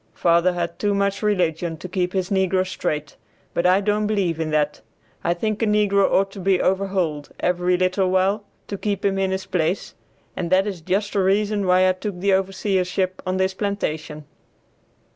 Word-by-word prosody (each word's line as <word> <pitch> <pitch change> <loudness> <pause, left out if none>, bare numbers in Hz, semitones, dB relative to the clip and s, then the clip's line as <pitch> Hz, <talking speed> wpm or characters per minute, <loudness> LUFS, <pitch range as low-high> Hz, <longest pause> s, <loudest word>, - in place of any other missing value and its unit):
Father 170 +1 +3
had 170 -1 -3
too 205 -1 +1
much 200 0 0
religion 175 -5 0
to 185 - -7
keep 180 0 -1
his 190 -1 -1
negroes 190 -1 +1
straight; 150 -5 -3 0.4
but 170 - +2
I 185 +2 +4
don't 210 +1 +1
believe 190 -6 0
in 160 -1 -1
that. 150 -1 0 0.4
I 170 - +1
think 215 +4 -2
a 225 - +2
negro 205 -2 +3
ought 195 0 +2
to 195 - -9
be 190 0 +2
overhauled 185 -6 0
every 180 0 +1
little 185 +1 +1
while 190 +3 +1 0.2
to 200 - -5
keep 200 -2 -2
him 195 -1 +1
in 190 0 +1
his 190 0 -3
place, 175 +1 -1 0.4
and 170 - -3
that 190 +1 +4
is 195 -5 -4
just 195 +5 -1
the 200 - +1
reason 200 +1 +1
why 185 +1 +5
I - - +5
took 185 0 -5
the 200 +2 +1
overseership 190 -1 0
on 185 0 0
this 190 0 +1
plantation." 160 -7 -3
190 Hz, 185 wpm, -22 LUFS, 180-200 Hz, 0.4 s, why